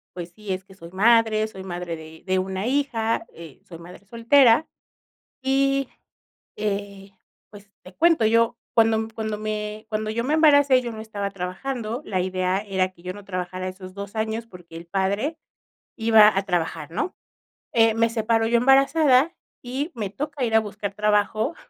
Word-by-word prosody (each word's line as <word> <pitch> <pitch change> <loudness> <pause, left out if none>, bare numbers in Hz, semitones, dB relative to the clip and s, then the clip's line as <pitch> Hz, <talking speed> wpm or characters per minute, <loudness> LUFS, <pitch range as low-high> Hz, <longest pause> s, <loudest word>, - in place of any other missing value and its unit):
pues 175 -1 -7
sí, 210 -3 -7
es 185 0 -4
que 190 - -16
soy 170 -2 -12
madre. 220 +2 +3
Soy 190 -3 -10
madre 175 -2 -5
de 160 0 -12
de 185 -1 +1
1 190 +2 -3
hija, 245 -4 0
eh, 165 -5 -13
soy 170 - -11
madre 180 +4 -14
soltera 235 +4 +4 0.7
y, 275 0 +1 0.7
eh, 200 -1 -4 0.4
pues 205 -1 -15
te 185 - -14
cuento, 330 -8 +3
yo 230 +1 +2 0.2
cuando 225 -1 +3
cuando 220 -1 -3
me 215 0 -4
cuando 215 0 -3
yo 235 +2 -2
me 295 - 0
embaracé, 285 -4 +5
yo 240 -1 -5
no 220 - -8
estaba 205 -2 -4
trabajando. 215 +6 -4
La 185 -8 -2
idea 185 0 0
era 190 -3 -1
que 175 -2 -22
yo 180 0 -5
no 205 0 -11
trabajara 185 -1 -4
esos 185 0 -10
2 200 +2 -8
años 220 +1 -2
porque 175 -5 -14
el 165 +1 -8
padre 200 - -1 0.6
iba 220 -3 +6
a 195 - +1
trabajar, 165 -4 -2
¿no? 365 - -3 0.6
Eh, 225 -1 +4
me 230 0 +2
separo 225 0 +1
yo 235 +1 +3
embarazada 275 +4 +4 0.3
y 265 +7 -4
me 210 -4 -4
toca 280 +2 -4
ir 225 -1 -1
a 220 - +6
buscar 205 -1 -5
trabajo 210 +6 +1
215 Hz, 170 wpm, -23 LUFS, 190-235 Hz, 0.7 s, iba